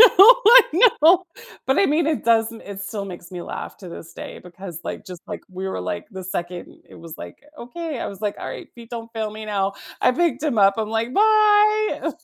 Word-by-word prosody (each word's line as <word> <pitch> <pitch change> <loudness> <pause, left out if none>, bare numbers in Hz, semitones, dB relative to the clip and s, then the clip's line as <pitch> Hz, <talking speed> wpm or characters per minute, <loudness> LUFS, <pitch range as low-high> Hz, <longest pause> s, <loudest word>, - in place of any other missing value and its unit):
I 485 +1 +8 0.4
know. 345 +4 +6 0.5
But 265 - +2
I 395 - +4
mean, 310 +2 +1
it 310 -7 -2
doesn't 225 0 +1
it 200 -1 -8
still 205 0 -5
makes 175 -3 -10
me 180 -1 -7
laugh - - -7
to 185 - -11
this 165 -1 -10
day - - -9
because, 180 -1 -10
like - - -7
just, 180 -2 -9
like, - - -6
we 190 +1 -6
were, 140 - -4
like, 90 -1 -5
the 190 -1 -8
2nd 175 -1 -6
it - - -15
was, 165 -1 -11
like, - - -10 0.2
"Okay." 300 +3 -6
I - - -3
was 195 -1 -10
like, 210 -2 -3
"Alright, - - -7
feet 235 -1 -14
don't 230 -1 -7
fail 220 -1 -3
me 215 +1 -8
now." 200 -2 -2 0.3
I - - +4
picked 335 +2 0
him 290 -8 -1
up. 195 -1 +5
I'm 215 -1 -2
like, 225 +3 -2
"Bye!" 425 0 +3
225 Hz, 215 wpm, -21 LUFS, -, 0.5 s, I